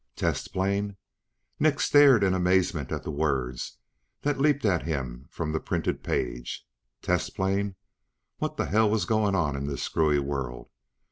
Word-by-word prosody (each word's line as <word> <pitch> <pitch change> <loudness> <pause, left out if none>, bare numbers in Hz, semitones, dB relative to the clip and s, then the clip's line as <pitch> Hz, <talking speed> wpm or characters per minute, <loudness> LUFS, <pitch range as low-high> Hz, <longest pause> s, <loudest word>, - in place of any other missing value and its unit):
Test - - -1
plane? 100 +1 -1 0.6
Nick 150 -1 +3
stared 140 -7 +6
in 95 -1 +3
amazement 90 -5 +1
at - - -3
the - - -4
words 70 -5 -2 0.5
that 145 -1 0
leaped 145 -2 +2
at 90 -5 +3
him 65 -4 -4
from 80 -2 -3
the 80 - 0
printed - - -2
page. - - -3 0.4
Test 90 0 0
plane? 100 +1 0 0.6
What - - -3
the - - 0
hell 110 +1 +3
was 110 0 +1
going 110 -3 +2
on 75 -6 +1
in 70 0 -3
this 70 - -3
screwy 75 -2 +2
world? 70 -4 -4
90 Hz, 155 wpm, -27 LUFS, 70-105 Hz, 0.6 s, stared